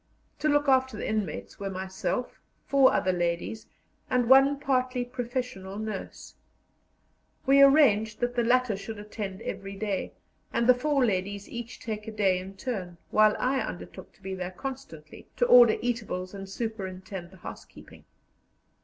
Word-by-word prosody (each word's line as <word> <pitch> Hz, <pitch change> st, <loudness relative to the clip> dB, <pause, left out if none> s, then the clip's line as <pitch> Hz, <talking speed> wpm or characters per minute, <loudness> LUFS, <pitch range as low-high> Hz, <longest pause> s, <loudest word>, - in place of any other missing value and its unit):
To 305 Hz, -, +1 dB
look 290 Hz, 0 st, +2 dB
after 260 Hz, -4 st, +3 dB
the -, -, -4 dB
inmates 210 Hz, -8 st, -3 dB
were 200 Hz, -1 st, -3 dB
myself, 190 Hz, +6 st, -4 dB, 0.2 s
four 275 Hz, -1 st, +5 dB
other 185 Hz, -, +1 dB
ladies, 175 Hz, +4 st, -2 dB, 0.4 s
and 250 Hz, -2 st, +2 dB
one 270 Hz, +2 st, +6 dB
partly 255 Hz, -3 st, 0 dB
professional 245 Hz, -6 st, -4 dB
nurse. 215 Hz, -2 st, -6 dB, 1.1 s
We 275 Hz, +1 st, +6 dB
arranged 240 Hz, -7 st, +5 dB
that 245 Hz, 0 st, 0 dB
the 240 Hz, -, +2 dB
latter 250 Hz, -2 st, +2 dB
should 220 Hz, +2 st, -7 dB
attend 205 Hz, -2 st, -6 dB
every 195 Hz, 0 st, -5 dB
day, 200 Hz, -2 st, -3 dB, 0.4 s
and 235 Hz, -, +1 dB
the 250 Hz, -, +8 dB
four 275 Hz, +1 st, +1 dB
ladies 200 Hz, -1 st, -2 dB
each 235 Hz, 0 st, -7 dB
take 215 Hz, -1 st, -5 dB
a -, -, -4 dB
day 195 Hz, -4 st, +2 dB
in 190 Hz, +1 st, -9 dB
turn, 190 Hz, -9 st, -4 dB
while 215 Hz, 0 st, +5 dB
I 265 Hz, +2 st, +1 dB
undertook -, -, -7 dB
to 195 Hz, -, -27 dB
be 190 Hz, 0 st, -4 dB
there 180 Hz, -1 st, -4 dB
constantly 185 Hz, -, -8 dB
to 245 Hz, -, +2 dB
order 240 Hz, -2 st, +7 dB
eatables 215 Hz, -6 st, -3 dB
and 195 Hz, -1 st, -8 dB
superintend 190 Hz, -4 st, -5 dB
the 190 Hz, -, -16 dB
housekeeping. -, -, -12 dB
220 Hz, 155 wpm, -28 LUFS, 190-255 Hz, 1.1 s, the